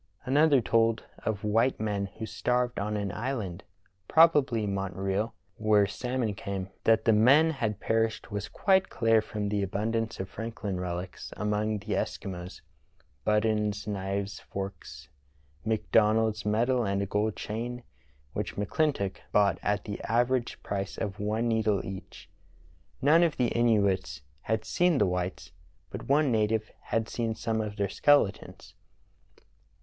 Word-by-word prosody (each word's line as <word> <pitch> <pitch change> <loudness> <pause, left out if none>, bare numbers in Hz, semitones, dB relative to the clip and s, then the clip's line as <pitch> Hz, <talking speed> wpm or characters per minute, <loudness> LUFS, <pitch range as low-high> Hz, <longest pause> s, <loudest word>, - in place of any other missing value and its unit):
Another 145 0 +4
told 115 0 +2 0.2
of 105 -3 -2
white 115 +5 +2
men 105 -2 -1
who 110 - -4
starved 125 +3 0
on 105 +1 -1
an 100 -2 -2
island 105 -6 -4 0.4
(probably 145 -9 +4
Montreal) 95 +2 -2 0.2
where 105 -1 +4
salmon 120 +1 -2
came. 95 -1 -5 0.2
That 110 -1 +4
the 115 - +5
men 140 +9 +6
had 110 -8 -2
perished 115 0 0
was 100 0 -3
quite 190 -1 +2
clear 115 -2 +3
from 105 -1 -4
the 105 0 0
abundance 110 +4 -2
of 95 - -3
Frank 115 +3 -6
hn 95 -3 -3
relics 90 0 -5
among 105 0 0
the 100 +1 -4
Eskimos 90 -1 -4 0.3
— 65 - -37
buttons, 105 -1 +1
knives, 100 -1 -3
forks, 95 -7 -7 0.6
McDonald's 110 0 +2
medal 120 +4 +2
and 100 -1 0
a - - -1
gold 105 +2 0
chain, 120 +3 -5 0.5
which - - -3
McClintock 105 -1 0
bought 100 -4 +3
at 105 0 0
the 100 - -6
average 120 +2 0
price 100 -1 -3
of 100 -1 -4
one 110 +3 0
needle 110 -3 +1
each. 95 -3 -8 0.8
None 155 +5 +6
of 170 -3 +2
the 125 -2 +2
Inuits 100 -11 +1 0.2
had 110 0 -1
seen 175 -3 +2
the - - +4
whites, 90 -6 -3 0.4
but - - -7
one 145 -1 +4
native 110 0 +1
had 115 -1 0
seen 115 -1 -2
some 110 0 -1
of 105 -1 -4
their 100 -2 0
skeletons. 145 -4 +1
110 Hz, 145 wpm, -28 LUFS, 100-115 Hz, 0.8 s, men